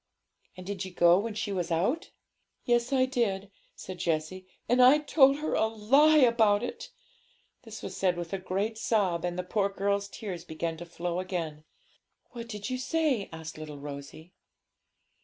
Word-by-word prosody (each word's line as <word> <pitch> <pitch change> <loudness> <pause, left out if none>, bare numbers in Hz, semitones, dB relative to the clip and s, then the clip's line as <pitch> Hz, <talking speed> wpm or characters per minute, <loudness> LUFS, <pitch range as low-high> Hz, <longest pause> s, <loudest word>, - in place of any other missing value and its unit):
'And 185 - -9
did 200 0 -4
you 190 - -6
go 175 0 +5
when 220 +1 -4
she 215 -1 -3
was 180 -3 -2
out?' 190 - 0 0.6
'Yes, 240 +1 +1
I 260 -1 +3
did,' 205 -7 -1 0.2
said 185 -1 -8
Jessie; 170 +3 -2 0.2
'and 250 +1 +4
I 255 +4 +8
told 285 -2 +4
her 305 +1 -3
a 220 - +2
lie 270 +9 +4
about 230 -5 +4
it.' 245 - -6 0.7
This 225 -3 -10
was - - -6
said 180 -2 +1
with 170 0 -5
a 195 - -1
great 200 +4 -2
sob, 190 -8 +1
and 175 0 -2
the 180 - -2
poor 200 +2 0
girl's 200 0 -1
tears 190 -5 -7
began 165 0 -4
to 175 +1 -9
flow 175 +1 -3
again. 165 -5 -4 0.7
'What 235 -1 -8
did 210 -2 -5
you 255 0 -3
say?' 280 -6 0
asked 160 -1 -8
little 150 -2 -8
Rosalie. 145 +4 -9
200 Hz, 175 wpm, -29 LUFS, 175-235 Hz, 0.7 s, I